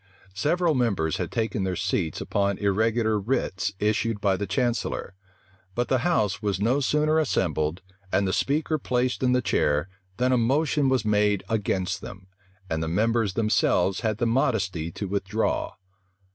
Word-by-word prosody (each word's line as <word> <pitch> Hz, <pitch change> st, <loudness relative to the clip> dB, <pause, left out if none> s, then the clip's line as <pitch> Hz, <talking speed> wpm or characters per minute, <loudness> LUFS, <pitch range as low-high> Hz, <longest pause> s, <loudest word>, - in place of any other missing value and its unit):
Several 160 Hz, -, +1 dB
members 100 Hz, -, 0 dB
had -, -, -3 dB
taken 110 Hz, -3 st, -1 dB
their 95 Hz, -1 st, -1 dB
seats 90 Hz, -4 st, -1 dB
upon 100 Hz, -1 st, 0 dB
irregular 110 Hz, +2 st, +1 dB
writs 100 Hz, -3 st, -1 dB
issued 105 Hz, +1 st, 0 dB
by 100 Hz, -2 st, +2 dB
the 100 Hz, +1 st, -3 dB
chancellor; 115 Hz, 0 st, -1 dB, 0.6 s
but 120 Hz, -1 st, -1 dB
the 130 Hz, -, +3 dB
house 105 Hz, -, +1 dB
was 100 Hz, -3 st, -1 dB
no 120 Hz, +7 st, +2 dB
sooner 150 Hz, +3 st, +2 dB
assembled, 85 Hz, -, 0 dB, 0.3 s
and 100 Hz, -, +2 dB
the 95 Hz, -, 0 dB
speaker 155 Hz, +5 st, 0 dB
placed 125 Hz, -1 st, -1 dB
in 125 Hz, -1 st, +3 dB
the 125 Hz, 0 st, +2 dB
chair, 75 Hz, -5 st, +1 dB, 0.3 s
than 125 Hz, +1 st, +2 dB
a 125 Hz, -, +4 dB
motion 140 Hz, +3 st, +2 dB
was 130 Hz, -5 st, +1 dB
made 105 Hz, -1 st, +2 dB
against 95 Hz, -3 st, -1 dB
them; 95 Hz, -1 st, -10 dB, 0.4 s
and 80 Hz, -2 st, -2 dB
the 80 Hz, -, -2 dB
members 110 Hz, +3 st, +1 dB
themselves 100 Hz, -4 st, +2 dB
had 110 Hz, -3 st, -1 dB
the 120 Hz, -, 0 dB
modesty 100 Hz, -9 st, 0 dB
to 100 Hz, -, -5 dB
withdraw. 100 Hz, +3 st, -1 dB
105 Hz, 160 wpm, -25 LUFS, 95-125 Hz, 0.6 s, a